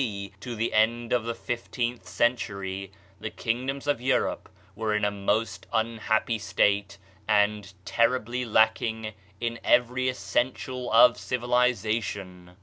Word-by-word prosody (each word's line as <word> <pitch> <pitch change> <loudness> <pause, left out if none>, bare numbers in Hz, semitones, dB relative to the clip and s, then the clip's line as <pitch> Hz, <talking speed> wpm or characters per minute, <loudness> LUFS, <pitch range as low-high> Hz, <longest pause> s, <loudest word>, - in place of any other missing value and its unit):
D. 100 -5 -3
to 120 +3 -6
the 115 +1 -1
end 115 +2 +2
of 120 -2 +1
the 115 0 -2
fifteenth 120 0 -3
cen 120 +1 +2
tury, 100 -4 -5 0.3
the 110 - -4
kingdoms 130 +6 -3
of 145 -5 0
Europe 130 +1 0 0.3
were 110 0 -1
in 105 -1 +1
a 105 - +1
most 105 +3 -1
un 115 0 0
happy 110 +1 +1
state 100 -1 +1 0.3
and 105 -1 +2
terribly 120 +2 +1
lacking 110 -1 +1 0.3
in 115 -1 -2
every 125 +1 +3
essential 125 +3 -2
of 115 +2 +7
civilization. 110 -7 -1
115 Hz, 135 wpm, -27 LUFS, 105-120 Hz, 0.3 s, of